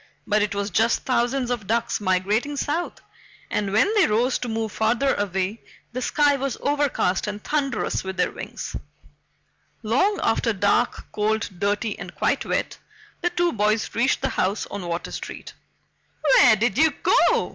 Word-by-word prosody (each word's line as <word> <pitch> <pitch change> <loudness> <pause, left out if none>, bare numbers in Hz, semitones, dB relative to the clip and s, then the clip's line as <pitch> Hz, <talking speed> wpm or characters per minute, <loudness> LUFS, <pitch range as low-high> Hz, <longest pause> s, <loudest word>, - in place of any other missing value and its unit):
But 210 0 +2
it 205 -1 -1
was 200 0 -2
just 225 +1 +2
thousands 250 0 0
of 225 -5 -3
ducks 230 0 0
migrating 205 +9 0
south, 320 +5 -2 0.5
and 200 -2 -1
when 225 - +3
they 415 -4 +4
rose 240 +5 +1
to 245 - -4
move 220 -1 -2
farther 235 +5 +1
away, 195 +2 -2 0.3
the 255 - -3
sky 290 +2 +3
was 270 -1 -3
overcast 285 -10 0
and 210 0 -5
thunderous 275 -6 -1
with 190 0 -5
their - - +1
wings. - - -7 1.1
Long 275 - +2
after 225 0 +1
dark, 205 +4 +1
cold, 220 +1 0
dirty, 205 +2 -1
and - - -8
quite - - 0
wet, - - -2 0.4
the 350 - +1
two 350 0 0
boys 215 +1 0
reached 245 +3 +1
the - - +1
house 195 +3 -1
on 195 -3 -5
Water 170 0 -4
Street. - - -7 0.7
"Where 265 -6 +6
did 230 +3 0
you 320 0 +6
go?" - - +3
225 Hz, 160 wpm, -23 LUFS, 205-270 Hz, 1.1 s, Where